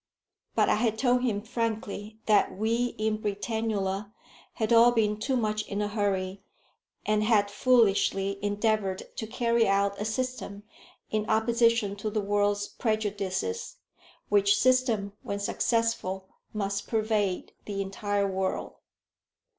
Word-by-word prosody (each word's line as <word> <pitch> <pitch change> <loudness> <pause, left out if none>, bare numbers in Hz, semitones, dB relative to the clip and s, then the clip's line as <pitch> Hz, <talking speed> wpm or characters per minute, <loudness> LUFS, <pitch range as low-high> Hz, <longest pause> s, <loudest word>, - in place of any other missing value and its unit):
But - - +3
I - - +3
had 220 -1 0
told 250 +1 +2
him 210 -5 -1
frankly 220 -2 -3
that 210 -3 +3
we 230 +3 0
in 215 0 0
Britannula 205 -1 -2 0.4
had 220 +1 0
all 235 +1 +7
been 215 -3 +1
too 260 +4 0
much 215 -2 0
in 200 - -3
a 210 - 0
hurry, 195 -2 -1 0.6
and 215 0 +2
had 210 -2 +3
foolishly 200 -4 +2
endeavoured 205 -2 0
to 220 - -3
carry 235 0 +1
out 200 +1 +1
a - - -1
system 225 -3 -3 0.5
in 215 0 -1
opposition 230 -2 +2
to 215 +2 -3
the 215 0 -1
world's 205 0 +1
prejudices, 200 - -2 0.5
which 205 0 +4
system, 245 -6 +2
when 200 - -4
successful, 200 -3 -1 0.2
must 200 -1 -3
pervade 215 -4 0
the 200 -1 -4
entire 200 +1 -1
world. 190 -1 -2
210 Hz, 130 wpm, -28 LUFS, 200-225 Hz, 0.6 s, all